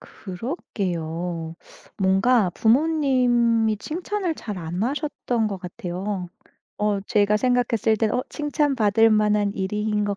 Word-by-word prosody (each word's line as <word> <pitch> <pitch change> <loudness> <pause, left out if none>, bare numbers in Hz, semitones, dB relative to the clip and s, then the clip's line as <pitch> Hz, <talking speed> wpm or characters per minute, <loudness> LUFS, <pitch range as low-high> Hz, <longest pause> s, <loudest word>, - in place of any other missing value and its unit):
그렇게요. 175 - -5 0.4
뭔가 195 +2 +3
부모님이 240 - +2
칭찬을 355 - -3
잘 210 -9 -6
안 175 +3 -4
하셨던 250 -3 -1
것 200 -2 -5
같아요. 180 0 -5 0.5
어 210 -1 +1
제가 210 0 +2
생각했을 235 -2 +1
때 220 0 +1
어 250 - 0
칭찬받을 255 -8 +2
만한 210 -1 +2
일인 210 +2 -1
것 205 -1 -2
215 Hz, 235 characters per minute, -23 LUFS, 195-245 Hz, 0.5 s, 뭔가